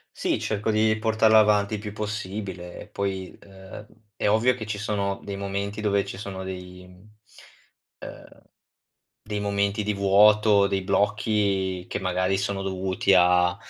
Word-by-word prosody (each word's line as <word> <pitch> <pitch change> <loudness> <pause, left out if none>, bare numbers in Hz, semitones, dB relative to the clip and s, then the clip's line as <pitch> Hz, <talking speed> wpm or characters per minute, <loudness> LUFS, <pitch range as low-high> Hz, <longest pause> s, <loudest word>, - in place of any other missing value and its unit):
Sì, - - -1
cerco 110 0 -2
di 110 0 +2
portarla 110 0 +4
avanti 105 -1 +3
il 105 - -2
più 105 0 -7
possibile 100 -4 -6
e - - -11
poi, 95 -2 -4
ehm, 95 +2 -12 0.3
è - - 0
ovvio 110 +4 +3
che 115 -4 -7
ci 105 -1 -3
sono 100 -1 -2
dei 100 - -5
momenti 100 +1 -4
dove 100 -2 +1
ci - - -7
sono 95 -2 -6
dei 90 -1 -8 1.1
ehm, - - -12 0.8
dei 105 0 -4
momenti 100 0 0
di 105 0 -1
vuoto, 100 +1 +4
dei 100 -1 -1
blocchi 100 -2 0
che - - -3
magari 95 0 0
sono 100 0 -2
dovuti 95 0 0
a, 90 +1 +4
100 Hz, 150 wpm, -25 LUFS, 95-105 Hz, 1.1 s, portarla